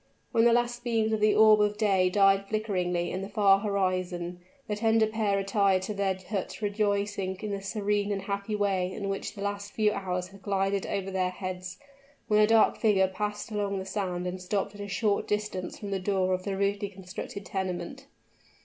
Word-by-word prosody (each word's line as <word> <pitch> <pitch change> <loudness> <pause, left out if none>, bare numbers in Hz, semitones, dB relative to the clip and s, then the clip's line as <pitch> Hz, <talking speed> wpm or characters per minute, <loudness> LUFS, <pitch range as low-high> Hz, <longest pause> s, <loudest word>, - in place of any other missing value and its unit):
When 230 0 +4
the 235 - +6
last 240 0 +1
beams 225 -2 +1
of 220 - +1
the 210 0 +4
orb 215 -1 +7
of 210 0 +1
day 195 -4 +3
died 195 0 +4
flickeringly 180 -5 -1
in 185 - -3
the 195 - -6
far 200 -2 +4
horizon, 185 -3 -1 0.3
the 210 - -1
tender 225 +1 +3
pair 215 -2 0
retired 195 -1 +2
to 210 - -3
their 195 -2 0
hut 195 -3 -3
rejoicing 205 -2 -1
in 210 +2 -5
the 200 -1 -3
serene 205 0 -1
and 195 -1 -2
happy 200 +1 -3
way 195 -3 0
in 195 +1 -4
which 195 +2 -4
the 200 - -6
last 200 0 -4
few 215 -1 +2
hours 180 -2 -3
had 195 0 -15
glided 195 0 0
over 195 -1 -2
their 185 -1 0
heads 185 0 -6 0.5
when 210 -2 +3
a 210 - +6
dark 225 0 +4
figure 195 -4 +4
passed 210 +3 -4
along 205 -2 -1
the 190 - -4
sand 185 -3 -3
and 180 +1 -4
stopped 195 +2 -2
at 205 - -9
a 205 - -5
short 200 +1 0
distance 210 -3 -2
from 205 -1 -6
the 195 - 0
door 185 -1 +1
of 185 0 -2
the 195 -1 -2
rudely 200 0 0
constructed 195 +1 -8
tenement. 190 +10 -4
200 Hz, 200 wpm, -28 LUFS, 190-210 Hz, 0.5 s, orb